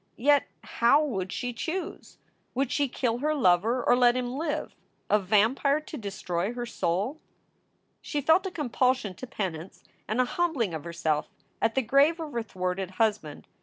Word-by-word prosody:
Yet 285 +4 +3 0.2
how 265 +6 +3
would 190 -9 -3
she 245 0 -3
choose? 335 +8 -5 0.4
Would 265 0 0
she 285 -1 +1
kill 240 -2 -1
her 305 +3 0
lover 230 +1 +3
or - - +4
let 245 -1 +4
him 250 -1 -2
live, 305 +1 -3 0.4
a 210 - +5
vampire 220 +9 +2
to 310 - -9
destroy 195 - -3
her 240 -1 -3
soul? 210 - -2 0.8
She 295 - -3
felt 320 +7 +3
a - - -2
compulsion 255 - 0
to 255 - -9
penance 185 -7 -5 0.2
and 215 +3 -1
a 255 - +4
humbling 265 - 0
of 160 -1 -5
herself 160 -3 -1 0.3
at 225 - +1
the 265 - +2
grave 280 +8 +4
of 315 -2 -5
her 235 - -1
thwarted 185 -2 -3
husband. 205 -10 0
240 Hz, 165 wpm, -27 LUFS, 195-285 Hz, 0.8 s, a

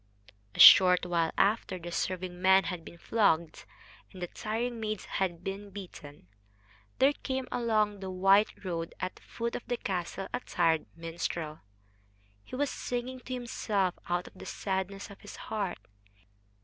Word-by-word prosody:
A - - -9
short 180 -1 +9
while 170 -2 +1
after 200 -2 +2
the 175 0 -7
serving 180 0 -3
men 190 +1 +6
had 180 -3 -4
been 170 - -12
flogged 170 -6 +1 0.5
and 185 - -11
the 180 - -2
tiring 230 +6 -3
maids 215 -2 -3
had 180 -3 -2
been 200 +2 -5
beaten, 170 - -10 0.7
there 275 +2 +5
came 265 -2 -4
along 215 -4 +1
the 190 -1 -5
white 195 +3 +3
road 165 -2 -3
at 185 - -3
the - - -18
foot 235 0 -4
of - - -6
the 245 - -1
castle 190 -1 -3
a 245 - 0
tired 165 -8 +1
minstrel. 165 -1 -4 0.8
He - - -8
was 285 +1 0
singing 250 +1 -4
to 255 +1 -7
himself 210 -6 -1 0.2
out 175 0 0
of - - -12
the 185 - -11
sadness 195 +1 -3
of 200 - -13
his 205 - -10
heart. 200 -5 -3
190 Hz, 160 wpm, -30 LUFS, 175-220 Hz, 0.8 s, short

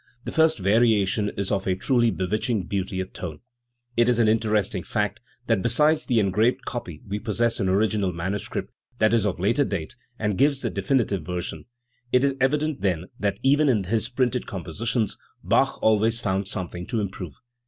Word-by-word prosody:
The - - -5
first 160 -2 +3
variation 105 0 +2
is 100 -1 -2
of 100 -1 -1
a 95 - +2
truly 120 +4 +2
bewitching 105 +2 -1
beauty 95 +1 -3
of 95 0 -5
tone. 80 -5 -6 0.5
It 120 +1 +4
is 120 - +3
an 115 -2 +4
interesting 110 -3 +1
fact 105 +1 -2 0.3
that 115 -5 +1
besides 150 +8 +3
the 120 -3 +3
engraved 105 +4 +1
copy 90 -10 -6
we 100 +1 -3
possess 115 +2 0
an 95 - +1
original 100 0 +1
manuscript, 95 +4 -4 0.3
that 110 -1 +3
is 110 -3 +3
of 95 - -3
later 115 +10 +2
date, 95 - -4 0.2
and 105 -3 -1
gives 140 -1 +3
the 115 - -2
definitive 105 - 0
version. 90 +1 -5 0.5
It 125 +1 +4
is 140 -1 +3
evident, 150 +2 +1
then, 90 -2 -1
that 100 -1 -1
even 145 +2 +4
in 110 -6 +2
his 110 +4 -1
printed 125 -1 0
compositions 105 +6 -2 0.2
Bach - - +2
always 110 +1 +3
found 95 -2 -1
something 90 -2 -4
to 115 - -1
improve. 95 -6 -5
105 Hz, 175 wpm, -25 LUFS, 95-120 Hz, 0.5 s, It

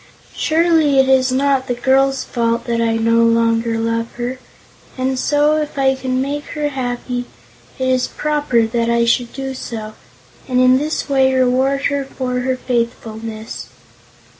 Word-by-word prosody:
Surely 320 -3 +2
it 265 0 +5
is 260 -1 +3
not 270 0 +1
the 245 - -1
girl's 270 +2 +2
fault 235 -1 -1
that 235 -2 -1
I 225 -1 +1
no 230 +1 +3
longer 230 0 +2
love 230 0 -1
her, 245 +2 -4 0.6
and 260 0 -1
so, 295 +2 +2
if 300 -1 -6
I 265 -1 +3
can 260 -1 -2
make 285 +2 -3
her 295 -1 0
happy, 245 -2 -3 0.5
it 260 - -1
is 255 -1 +1
proper 295 -6 0
that 230 +1 -1
I 235 0 +2
should 235 0 +1
do 270 0 -5
so, 220 -4 -6 0.5
and 255 -1 +1
in 255 +1 +5
this 305 +2 -2
way 265 -2 +3
reward 260 +2 +2
her 285 -1 0
for 255 -2 -3
her 255 +1 -1
faithfulness." 225 - -4
255 Hz, 160 wpm, -18 LUFS, 235-270 Hz, 0.6 s, it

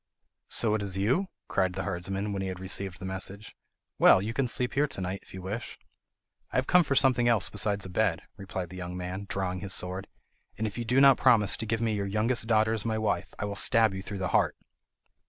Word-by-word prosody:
"So 110 -2 +1
it 110 - 0
is 95 -2 -1
you?" 130 - +1 0.2
cried 95 -1 0
the - - -4
herdsman, 95 +3 -3
when 100 - -3
he 95 - -3
had 90 -1 -5
received 95 0 -1
the 95 - -8
message. 95 +2 -4 0.4
"Well, - - +7
you 105 +4 -3
can 135 +1 0
sleep 125 +1 -2
here 145 +2 +2
to 140 - -6
night 95 +1 -3
if - - -19
you 95 -1 -8
wish." 105 +5 -5 0.7
"I - - -8
have 130 - +2
come 180 +4 +5
for 140 -3 -1
something 125 -3 +4
else 115 -4 +3
besides 105 -2 0
a - - -7
bed," 90 -2 0
replied 95 -3 -6
the 95 - -9
young 90 0 -6
man, 90 +2 -5
drawing 95 -2 -2
his 95 +1 0
sword, 90 +1 -1 0.5
"and 110 - -2
if 105 - -4
you 120 - -4
do 125 +4 +2
not 135 -2 +7
promise 115 -6 +4
to 110 - -5
give 115 +1 -1
me 115 -2 0
your 100 -1 -2
youngest 110 +3 0
daughter 110 -1 +3
as 110 -3 -3
my 110 -1 -1
wife 105 -4 -2
I - - -3
will 100 0 -4
stab 110 0 +4
you 95 - -5
through 100 +1 -6
the 95 -1 -2
heart." - - +2
100 Hz, 240 wpm, -28 LUFS, 95-115 Hz, 0.7 s, Well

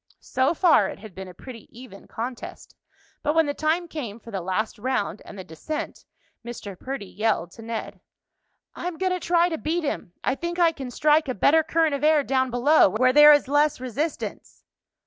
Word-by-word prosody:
So 260 +6 0
far, 345 -1 +4
it - - -8
had 210 -1 -12
been 190 +1 -8
a 180 - -11
pretty 235 +2 -11
even 230 -5 -13
contest, 240 +2 -7 0.5
but 300 +1 0
when 325 0 +4
the 285 - -2
time 320 +4 0
came 240 -10 -6
for 230 - -12
the 195 -3 -3
last 190 +5 -3
round 225 -3 -2
and 205 - -11
the 190 - -7
descent, 300 - -6 0.4
Mr. 230 -4 -8
Perdy 260 +2 -6
yelled 200 -4 -1
to 225 - -13
Ned: 225 0 -6 0.7
"I'm 350 -1 -5
going 370 +1 0
to 365 - -2
try 345 0 +2
to 325 -3 -4
beat 330 +3 -2
him. 240 - -4
I - - +1
think 345 +4 -5
I 340 -2 +4
can 270 -5 -7
strike 300 +4 +2
a 255 - -2
better 315 +10 +4
current 320 -1 +1
of 280 0 -3
air 305 -1 +4
down 260 -1 0
below, 250 +2 +4
where 255 +6 +2
there 295 +1 +9
is 290 -3 +4
less 290 +1 +2
resistance." 265 +6 -5
270 Hz, 200 wpm, -24 LUFS, 225-315 Hz, 0.7 s, there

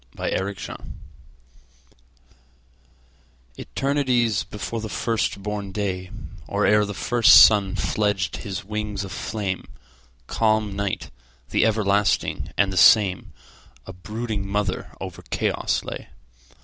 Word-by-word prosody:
Mother 95 +1 -1 0.2
Night - - -8 2.8
ETERNITIES 125 -8 0
before 110 +4 -5
the 110 - -5
first 110 -4 -1
born 105 -1 -4
day, 95 -2 -3 0.4
Or - - 0
ere 105 0 +4
the 105 -1 -6
first 120 +3 +7
sun 100 -3 +4
fledged 100 -4 -1
his 95 -3 -6
wings 105 -1 -3
of 95 - -8
flame, 100 -3 -4 0.6
Calm 110 - 0
Night, 100 -1 -3 0.4
the - - +2
everlasting 105 -2 +1
and 100 -2 +2
the - - -4
same,A 95 -1 +2
brooding 105 +2 -5
mother 100 -1 -2
over - - -7
chaos - - -1
lay. - - -7
105 Hz, 110 wpm, -23 LUFS, 95-110 Hz, 2.8 s, first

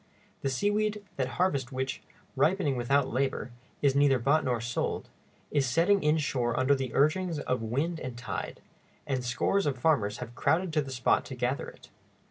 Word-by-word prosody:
The 135 - 0
seaweed, 205 +7 0
that 130 -2 0
harvest 145 -8 +1
which, 130 0 -3 0.3
ripening 150 0 +2
without 130 +3 +2
labor, 130 -1 -1 0.3
is 140 -2 +4
neither 140 -2 +5
bought 140 +6 +2
nor 125 -2 0
sold, 120 +2 -2 0.4
is 140 -3 +2
setting 175 +10 +3
inshore 140 -6 +1
under 130 +2 +4
the 135 -3 -2
urgings 160 +4 +2
of 125 -4 -1
wind 140 +9 -1
and 130 -4 -6
tide, 120 - -5 0.4
and 130 -3 -1
scores 150 +10 +1
of 135 -3 -1
farmers 120 -7 +2
have 120 -1 -7
crowded 170 +7 +1
to 155 - +3
the 135 - -7
spot 125 -2 +2
to 130 - -7
gather 125 +2 -1
it. - - -14
135 Hz, 170 wpm, -29 LUFS, 125-155 Hz, 0.4 s, neither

